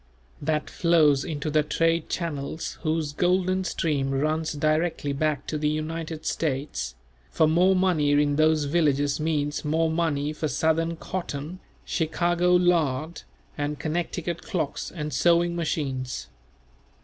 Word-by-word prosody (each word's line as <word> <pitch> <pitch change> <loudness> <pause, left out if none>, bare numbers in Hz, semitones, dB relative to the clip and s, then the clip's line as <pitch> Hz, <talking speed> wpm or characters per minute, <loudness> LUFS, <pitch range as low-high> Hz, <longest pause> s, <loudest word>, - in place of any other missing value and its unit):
That 150 +1 -1
flows 155 -5 +3
into 150 -1 -3
the 155 +1 +4
trade 165 +2 0
channels 160 -2 -4
whose 155 -2 -1
golden 185 +3 +1
stream 150 -5 0
runs 155 +4 0
directly 155 0 0
back 150 0 -1
to 155 - -3
the 150 0 +1
United 160 +1 -4
States; 130 - -2 0.3
for 160 - +3
more 180 +4 +4
money 180 -6 +2
in 145 0 +3
those 155 0 +3
villages 145 -2 +1
means 150 -2 -1
more 160 +1 +1
money 155 -3 0
for 155 +1 -2
Southern 160 +4 +1
cotton, 165 -1 -5 0.3
Chicago 175 +2 +1
lard, 165 -3 +1 0.3
and 145 0 -2
Connecticut 170 +2 -3
clocks 175 -10 -3
and 150 -3 -5
sewing 170 0 +3
machines. 135 -6 -3
155 Hz, 125 wpm, -26 LUFS, 145-170 Hz, 0.3 s, the